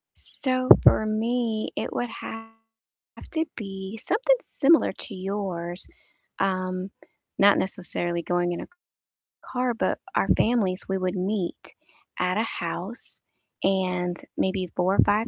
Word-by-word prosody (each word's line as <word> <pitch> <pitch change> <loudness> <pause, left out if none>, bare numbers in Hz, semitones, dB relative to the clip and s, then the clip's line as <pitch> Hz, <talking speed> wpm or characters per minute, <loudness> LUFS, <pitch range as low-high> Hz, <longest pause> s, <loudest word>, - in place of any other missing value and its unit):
So, 255 -1 -2
for 215 - +6
me, 225 0 0
it - - -2
would 245 -1 -2
have 225 0 -7 0.8
to 320 0 0
be 195 0 -6
something - - +2
similar 315 +3 +4
to 205 - -8
yours, 185 -2 -4 0.5
um, 185 0 -1 0.5
not 200 0 +7
necessarily 175 -2 -2
going 175 +1 0
in 170 - -3
a - - -8 0.7
car, 250 -1 -1
but - - 0 0.2
our - - +2
families, 210 -6 +1
we 190 0 0
would 185 0 -1
meet 190 -1 -2 0.4
at 180 +2 +1
a 220 - +2
house 190 +3 -5 0.4
and 180 -2 +1 0.2
maybe 185 -1 0
4 185 +2 +2
or - - -3
5 215 +3 +4
195 Hz, 130 wpm, -26 LUFS, 185-225 Hz, 0.8 s, not